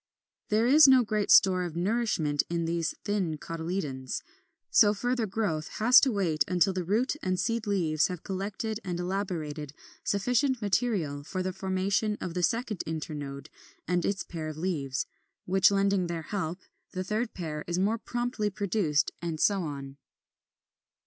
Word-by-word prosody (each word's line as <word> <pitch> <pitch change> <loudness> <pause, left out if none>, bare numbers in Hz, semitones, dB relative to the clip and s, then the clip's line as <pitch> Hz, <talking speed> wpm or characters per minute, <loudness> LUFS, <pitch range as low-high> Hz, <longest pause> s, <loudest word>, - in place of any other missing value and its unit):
There 215 +2 +3
is 285 +4 +8
no 260 -2 +7
great 215 -2 -1
store 185 -2 +6
of 175 -3 -4
nourishment 175 -6 +1
in 170 -1 -1
these 165 -1 -1
thin 190 -7 -1
cotyledons; 160 -5 -4 0.5
so 210 -1 +6
further 245 +1 -1
growth 185 -7 -2
has 245 +4 +7
to 270 - +2
wait 170 -8 +1
until 180 +1 +2
the 185 -1 -2
root 220 - +1
and 185 -1 -1
seed 230 -2 -1
leaves 165 -6 +2
have 180 -3 -6
collected 205 +3 -3
and 175 -2 -3
elaborated 170 -6 -3 0.3
sufficient 250 +6 +1
material 195 - 0
for 185 +5 -3
the 185 0 -2
formation 190 +3 0
of 175 - -5
the 180 - -2
second 225 +1 0
internode 145 -3 -5 0.4
and 175 0 +1
its 200 -2 -1
pair 160 -2 -6
of 155 -1 -6
leaves, 145 -7 -2 0.4
which 190 +1 +5
lending 195 -2 +2
their 170 -1 -4
help 175 -2 -3 0.4
the 185 - -2
third 215 +4 -2
pair 155 -4 -4
is 175 0 -1
more 210 +5 +1
promptly 240 -3 -2
produced, 195 -6 0
and 165 -2 -3
so 200 +2 +3
on. 140 -3 -6
185 Hz, 155 wpm, -29 LUFS, 160-210 Hz, 0.5 s, is